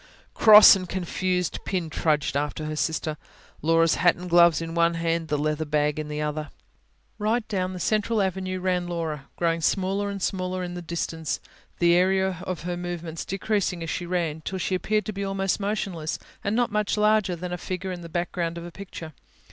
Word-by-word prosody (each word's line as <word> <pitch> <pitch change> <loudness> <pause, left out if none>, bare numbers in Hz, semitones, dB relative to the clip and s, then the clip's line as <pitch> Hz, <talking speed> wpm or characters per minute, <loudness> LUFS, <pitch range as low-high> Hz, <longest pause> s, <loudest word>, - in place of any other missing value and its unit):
Cross 215 -2 +9
and 185 -2 -5
confused 180 -1 -1
Pin 180 -4 -2
trudged 150 -2 0
after 150 +2 -2
her 155 0 -3
sister, 155 0 -1 0.4
Laura's 165 +1 +4
hat 175 - +5
and 180 0 -8
gloves 170 -1 +6
in 165 0 -5
one 170 0 +3
hand, 165 0 -1
the 150 -1 0
leather 155 +1 0
bag 150 0 0
in 155 - -4
the 150 0 -4
other. 150 0 -3 0.7
Right 220 +2 0
down 185 -3 -1
the 180 - -6
central 215 +4 +1
avenue 185 -1 -1
ran 180 -1 0
Laura, 160 -5 -4
growing 165 -1 0
smaller 195 +3 0
and 200 0 -4
smaller 185 -1 -2
in 175 0 -5
the 175 - -5
distance, 165 -1 -3 0.4
the 170 0 +4
area 190 0 +2
of 185 -3 -3
her 175 +1 -3
movements 175 -2 -5
decreasing 195 -3 -1
as 165 - -3
she 175 - -3
ran, 170 -3 -1
till 190 +4 -4
she 185 - -2
appeared 210 +3 0
to 215 - -4
be 200 +1 -4
almost 195 0 -1
motionless, 195 -6 -2 0.3
and 200 +2 0
not 240 -1 +1
much 210 0 0
larger 210 -3 +3
than 180 +1 -5
a - - -2
figure 185 0 -4
in 180 -1 -6
the 170 - -9
background 170 0 -2
of 170 - -6
a 175 - -8
picture. 170 -4 -9
175 Hz, 195 wpm, -25 LUFS, 165-190 Hz, 0.7 s, Cross